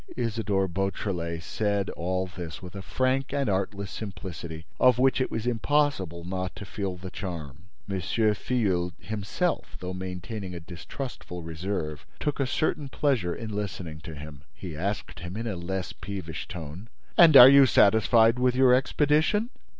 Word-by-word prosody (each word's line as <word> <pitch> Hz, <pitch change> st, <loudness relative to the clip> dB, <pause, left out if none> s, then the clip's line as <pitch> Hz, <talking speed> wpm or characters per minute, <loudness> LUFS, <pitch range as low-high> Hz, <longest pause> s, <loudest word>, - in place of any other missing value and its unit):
Isidore 110 Hz, -5 st, 0 dB
Beautrelet 90 Hz, -3 st, -2 dB
said 100 Hz, -1 st, -1 dB
all 95 Hz, +2 st, -2 dB
this 85 Hz, -4 st, -7 dB
with 90 Hz, -, -10 dB
a 100 Hz, -, -6 dB
frank 130 Hz, +6 st, 0 dB
and 140 Hz, -2 st, 0 dB
artless 100 Hz, 0 st, -1 dB
simplicity 85 Hz, -5 st, -7 dB
of 125 Hz, -2 st, +6 dB
which 130 Hz, +1 st, +3 dB
it -, -, 0 dB
was 115 Hz, 0 st, -3 dB
impossible 120 Hz, -, +1 dB
not 95 Hz, +1 st, -4 dB
to 100 Hz, -, -8 dB
feel 95 Hz, -1 st, -4 dB
the 95 Hz, 0 st, -8 dB
charm. 85 Hz, -4 st, -6 dB, 0.2 s
M. 100 Hz, -2 st, -2 dB
Filleul 105 Hz, -2 st, +1 dB
himself, 110 Hz, -, -2 dB
though 90 Hz, 0 st, -5 dB
maintaining 90 Hz, +1 st, -5 dB
a -, -, -5 dB
distrustful 90 Hz, +1 st, -7 dB
reserve, 80 Hz, -3 st, -4 dB
took 150 Hz, -1 st, -2 dB
a 135 Hz, -, +1 dB
certain 150 Hz, 0 st, -1 dB
pleasure 125 Hz, -13 st, 0 dB
in 110 Hz, -2 st, -6 dB
listening 90 Hz, -6 st, -4 dB
to 80 Hz, +1 st, -9 dB
him. 75 Hz, -1 st, -10 dB
He 90 Hz, -5 st, -7 dB
asked 100 Hz, +4 st, -3 dB
him, 85 Hz, +3 st, -6 dB
in 115 Hz, -, -3 dB
a 110 Hz, -4 st, -2 dB
less 85 Hz, 0 st, -4 dB
peevish 85 Hz, -3 st, -6 dB
tone: 85 Hz, +5 st, -8 dB, 0.3 s
"And 165 Hz, -5 st, +9 dB
are 125 Hz, -, +13 dB
you 140 Hz, 0 st, +8 dB
satisfied 110 Hz, +2 st, +5 dB
with 125 Hz, 0 st, +3 dB
your 130 Hz, -1 st, +6 dB
expedition?" 155 Hz, -, +2 dB
95 Hz, 160 wpm, -27 LUFS, 85-120 Hz, 0.3 s, are